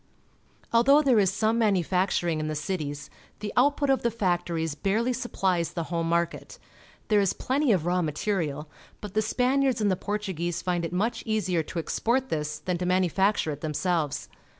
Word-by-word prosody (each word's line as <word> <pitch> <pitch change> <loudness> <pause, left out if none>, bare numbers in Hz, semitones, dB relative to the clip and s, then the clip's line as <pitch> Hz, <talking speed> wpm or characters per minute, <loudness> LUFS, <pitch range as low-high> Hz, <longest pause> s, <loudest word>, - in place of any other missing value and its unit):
Although 275 +6 +5
there 255 -6 +4
is 195 -2 +3
some 220 +3 +1
manufacturing 185 -5 +1
in 155 - -2
the 155 - -3
cities, 150 -2 -4 0.3
the 210 -1 -5
output 285 +2 +3
of 270 - +2
the 235 - +1
factories 175 -7 -1
barely 215 +10 0
supplies 190 -8 -1
the 170 - -2
home 165 -1 0
market. 170 +1 -1 0.5
There 210 -1 +4
is 195 - +1
plenty 270 0 0
of 180 -6 +1
raw 180 +1 +1
material, 155 -2 -2 0.3
but 210 -2 -8
the 215 - +2
Spaniards 255 +4 +1
and 205 -2 +2
the - - +2
Portuguese 180 -5 -3
find 175 -2 -1
it 165 - -3
much 205 +7 -1
easier 190 -6 +1
to 160 - -8
export 245 +10 0
this 150 -1 -2
than 180 -2 -3
to 180 - -2
manufacture 185 0 +2
it 145 0 -7
themselves. 155 -1 -1
185 Hz, 175 wpm, -27 LUFS, 170-220 Hz, 0.5 s, Although